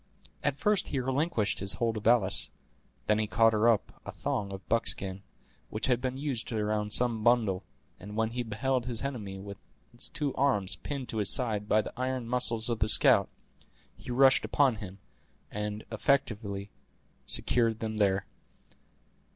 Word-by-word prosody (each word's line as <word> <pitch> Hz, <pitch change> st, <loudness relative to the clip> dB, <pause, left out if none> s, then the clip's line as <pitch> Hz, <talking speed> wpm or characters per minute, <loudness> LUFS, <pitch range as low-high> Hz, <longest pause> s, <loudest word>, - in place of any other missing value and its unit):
At 145 Hz, -, +1 dB
first 210 Hz, +5 st, +1 dB
he 140 Hz, -, -2 dB
relinquished 130 Hz, -2 st, -1 dB
his 100 Hz, 0 st, +2 dB
hold 115 Hz, -1 st, -1 dB
of 110 Hz, 0 st, -3 dB
Alice; 110 Hz, -5 st, +3 dB, 0.6 s
then 105 Hz, 0 st, +2 dB
he 110 Hz, -, 0 dB
caught 115 Hz, +1 st, +3 dB
up 110 Hz, 0 st, +1 dB
a -, -, -7 dB
thong 100 Hz, -2 st, -3 dB
of 95 Hz, -2 st, -9 dB
buckskin, 100 Hz, -4 st, -1 dB, 0.5 s
which 110 Hz, -, -2 dB
had 125 Hz, -2 st, +1 dB
been 130 Hz, 0 st, -3 dB
used 135 Hz, -4 st, -3 dB
around 105 Hz, -1 st, -1 dB
some 115 Hz, -2 st, +1 dB
bundle, 110 Hz, -6 st, +2 dB, 0.4 s
and 105 Hz, +2 st, -9 dB
when 110 Hz, 0 st, 0 dB
he 125 Hz, +1 st, -3 dB
beheld 120 Hz, +3 st, -2 dB
his 120 Hz, -1 st, -2 dB
enemy 110 Hz, -8 st, -5 dB
with 100 Hz, 0 st, -9 dB, 0.3 s
his -, -, -3 dB
two 145 Hz, -2 st, -3 dB
arms 115 Hz, -9 st, +2 dB
pinned 140 Hz, -3 st, -6 dB
to 110 Hz, -, -4 dB
his 105 Hz, -, 0 dB
side 105 Hz, -5 st, 0 dB
by 110 Hz, 0 st, +3 dB
the -, -, -8 dB
iron 130 Hz, -1 st, -3 dB
muscles 120 Hz, -2 st, +2 dB
of 120 Hz, -2 st, -1 dB
the 110 Hz, -, +2 dB
scout, -, -, +6 dB, 0.7 s
he -, -, -12 dB
rushed 130 Hz, 0 st, +4 dB
upon 125 Hz, +2 st, +2 dB
him, 100 Hz, -3 st, -9 dB, 0.5 s
and 105 Hz, +1 st, -4 dB
effectually 105 Hz, -4 st, -1 dB, 0.6 s
secured 115 Hz, -2 st, +1 dB
them 110 Hz, -1 st, -4 dB
there. 95 Hz, -2 st, +1 dB
110 Hz, 165 wpm, -29 LUFS, 105-125 Hz, 0.7 s, scout